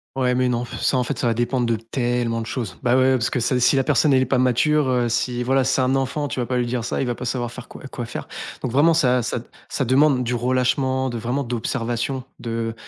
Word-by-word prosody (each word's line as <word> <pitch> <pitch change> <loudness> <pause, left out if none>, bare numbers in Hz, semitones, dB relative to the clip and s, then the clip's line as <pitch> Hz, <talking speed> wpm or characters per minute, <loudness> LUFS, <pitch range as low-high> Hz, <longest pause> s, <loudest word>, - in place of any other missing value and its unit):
Ouais, 130 -2 +1
mais, 125 0 +1
non, 120 0 0
pff, - - -8
ça, 130 - +2
en 125 - +2
fait, - - -4
ça 120 - +1
va 115 - +1
dépendre 120 0 0
de 115 - +2
tellement 120 0 -1
de 115 - -6
choses. 110 -9 -4
Ben 120 +1 +2
ouais, 130 - +4
ouais, 130 - +4
parce 120 -3 +1
que, 125 - -1
ça - - 0
c'est - - +2
si 130 - +4
la 135 - +3
personne 150 +3 +3
elle 130 -1 +4
est - - -2
pas 130 0 +1
mature, 130 +4 +2
heu, 125 -1 +1
si 125 +1 -1
voilà, 135 +1 +2
c'est 135 0 +1
un 130 +1 +2
enfant, 140 +2 -1
tu 130 - -4
vas 120 - -1
pas 125 - -1
lui 125 - +1
dire 120 -1 -2
ça, 120 - -2
il - - 0
va 120 - -1
pas 125 - -7
savoir 120 -1 -2
faire 125 +1 -10
quoi - - -12
quoi 120 - -5
faire. 120 - -7 0.4
Donc 130 - -2
vraiment, 155 +6 +4
ça 125 -6 +3
ça 120 - -2 0.3
ça 135 - -1
demande 130 +1 +3
du 125 0 -2
relâchement, 130 +2 +1
de 120 - -4
vraiment, 125 +5 -2
d'observation, 120 +1 -2 0.2
de 115 -1 -3
125 Hz, 280 wpm, -22 LUFS, 120-130 Hz, 0.4 s, ouais